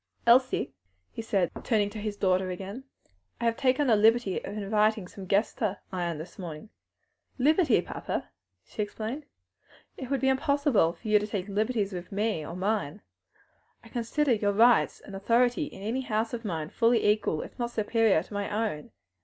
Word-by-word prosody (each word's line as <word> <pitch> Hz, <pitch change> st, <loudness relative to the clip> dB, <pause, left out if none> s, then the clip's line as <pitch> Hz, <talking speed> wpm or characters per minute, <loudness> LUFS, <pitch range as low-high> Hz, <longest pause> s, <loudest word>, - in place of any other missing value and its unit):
"Elsie," 255 Hz, +2 st, +4 dB, 0.4 s
he -, -, -6 dB
said, 195 Hz, -5 st, 0 dB
turning 215 Hz, -4 st, +2 dB
to 215 Hz, -, -7 dB
his 210 Hz, -1 st, -4 dB
daughter 185 Hz, -1 st, +1 dB
again, 195 Hz, +8 st, -6 dB, 0.5 s
"I -, -, -2 dB
have 230 Hz, 0 st, +2 dB
taken 265 Hz, +2 st, +2 dB
the 235 Hz, -4 st, +5 dB
liberty 220 Hz, -1 st, +3 dB
of 205 Hz, -, -6 dB
inviting 210 Hz, -1 st, +1 dB
some 190 Hz, 0 st, -10 dB
guests 200 Hz, +4 st, +2 dB
to 205 Hz, -3 st, 0 dB
Ion 175 Hz, -3 st, -2 dB
this 160 Hz, +6 st, -10 dB
morning." 170 Hz, +2 st, -7 dB, 0.7 s
"Liberty, 310 Hz, +6 st, +4 dB
papa!" -, -, -4 dB, 0.4 s
she -, -, -5 dB
exclaimed. 225 Hz, +8 st, -5 dB, 0.7 s
"It 260 Hz, -, -7 dB
would 275 Hz, -2 st, 0 dB
be 265 Hz, -, +2 dB
impossible 270 Hz, -, +2 dB
for 225 Hz, -, -11 dB
you 210 Hz, 0 st, +5 dB
to 210 Hz, -, -4 dB
take 200 Hz, -2 st, -3 dB
liberties 210 Hz, 0 st, -1 dB
with 180 Hz, 0 st, -7 dB
me 205 Hz, -4 st, -1 dB
or 165 Hz, +3 st, -7 dB
mine; 195 Hz, -3 st, -2 dB, 0.8 s
I -, -, -14 dB
consider 250 Hz, +3 st, 0 dB
your 205 Hz, -2 st, +1 dB
rights 235 Hz, +3 st, +4 dB
and 200 Hz, -, -10 dB
authority 240 Hz, +8 st, +2 dB
in 195 Hz, -, -10 dB
any 235 Hz, +5 st, -1 dB
house 225 Hz, -2 st, -1 dB
of 240 Hz, -1 st, -4 dB
mine 160 Hz, -7 st, -4 dB
fully 230 Hz, -1 st, +3 dB
equal, 210 Hz, -7 st, +1 dB
if -, -, -13 dB
not 240 Hz, 0 st, -1 dB
superior 220 Hz, -5 st, +2 dB
to 205 Hz, -, -14 dB
my 205 Hz, 0 st, -2 dB
own. 210 Hz, -8 st, -2 dB
215 Hz, 180 wpm, -28 LUFS, 195-240 Hz, 0.8 s, the